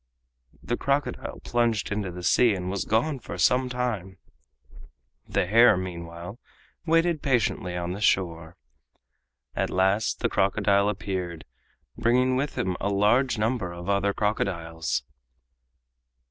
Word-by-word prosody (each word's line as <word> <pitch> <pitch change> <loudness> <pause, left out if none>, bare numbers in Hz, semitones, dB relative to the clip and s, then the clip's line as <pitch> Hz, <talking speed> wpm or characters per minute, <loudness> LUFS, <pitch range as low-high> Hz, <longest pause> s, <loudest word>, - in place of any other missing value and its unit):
The 120 - -2
crocodile 140 +2 -2
plunged 115 -4 0
into 105 -2 -2
the 90 0 -8
sea 115 +3 +4
and 90 0 -4
was 100 - -2
gone 130 +6 +1
for - - -8
some 125 0 +3
time. 115 -7 -3 1.1
The 100 - 0
hare, 115 +2 +6
meanwhile, 85 +2 -7 0.5
waited 165 -1 +2
patiently 105 -8 0
on 85 0 -3
the 100 +3 -5
shore. 85 -4 0 1.0
At - - 0
last 95 +4 +1
the - - +2
crocodile 100 +1 +2
appeared, 90 -5 -4 0.5
bringing 125 +2 +3
with 140 +2 -2
him 90 -1 -1
a 100 - -1
large 110 +6 +2
number 110 -4 -1
of 85 +2 -7
other 100 0 +2
crocodiles. 85 - -2
100 Hz, 125 wpm, -26 LUFS, 90-120 Hz, 1.1 s, hare